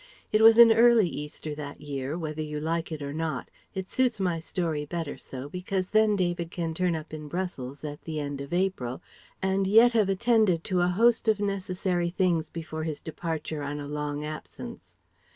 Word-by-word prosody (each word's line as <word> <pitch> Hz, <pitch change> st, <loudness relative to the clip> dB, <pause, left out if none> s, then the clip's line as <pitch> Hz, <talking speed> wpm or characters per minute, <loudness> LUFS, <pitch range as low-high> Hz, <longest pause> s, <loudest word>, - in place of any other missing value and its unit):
It 215 Hz, -, +3 dB
was 225 Hz, 0 st, +8 dB
an 235 Hz, -1 st, +10 dB
early 230 Hz, -2 st, +6 dB
Easter 150 Hz, 0 st, -6 dB
that 145 Hz, -1 st, -7 dB
year, 140 Hz, +1 st, -4 dB
whether 155 Hz, -2 st, -4 dB
you 150 Hz, -1 st, -4 dB
like 165 Hz, +2 st, -2 dB
it 155 Hz, -2 st, -4 dB
or 140 Hz, 0 st, -4 dB
not; 155 Hz, -4 st, -3 dB, 0.2 s
it 190 Hz, -1 st, -3 dB
suits 250 Hz, -2 st, +1 dB
my 180 Hz, -3 st, 0 dB
story 165 Hz, -3 st, -2 dB
better 160 Hz, 0 st, -4 dB
so, 130 Hz, +1 st, -8 dB
because 185 Hz, +3 st, -3 dB
then 215 Hz, -1 st, +4 dB
David 175 Hz, -3 st, -1 dB
can 165 Hz, -2 st, -3 dB
turn 180 Hz, 0 st, +1 dB
up 155 Hz, 0 st, -7 dB
in 155 Hz, -1 st, -6 dB
Brussels 145 Hz, -6 st, -4 dB
at 145 Hz, -1 st, -6 dB
the 155 Hz, -2 st, -4 dB
end 145 Hz, -1 st, -4 dB
of 140 Hz, -, -8 dB
April, 175 Hz, -9 st, -1 dB, 0.4 s
and 190 Hz, 0 st, +1 dB
yet 230 Hz, +4 st, +6 dB
have 215 Hz, -4 st, +3 dB
attended 205 Hz, -4 st, +3 dB
to 185 Hz, -3 st, 0 dB
a 175 Hz, -, +3 dB
host 225 Hz, +6 st, +3 dB
of 215 Hz, -2 st, +3 dB
necessary 185 Hz, -3 st, -1 dB
things 175 Hz, -3 st, +1 dB
before 160 Hz, -1 st, -6 dB
his 155 Hz, -2 st, -3 dB
departure 160 Hz, -1 st, -4 dB
on 145 Hz, +1 st, -4 dB
a 145 Hz, -, -6 dB
long 150 Hz, 0 st, -3 dB
absence. 155 Hz, 0 st, -8 dB
170 Hz, 190 wpm, -27 LUFS, 150-190 Hz, 0.4 s, an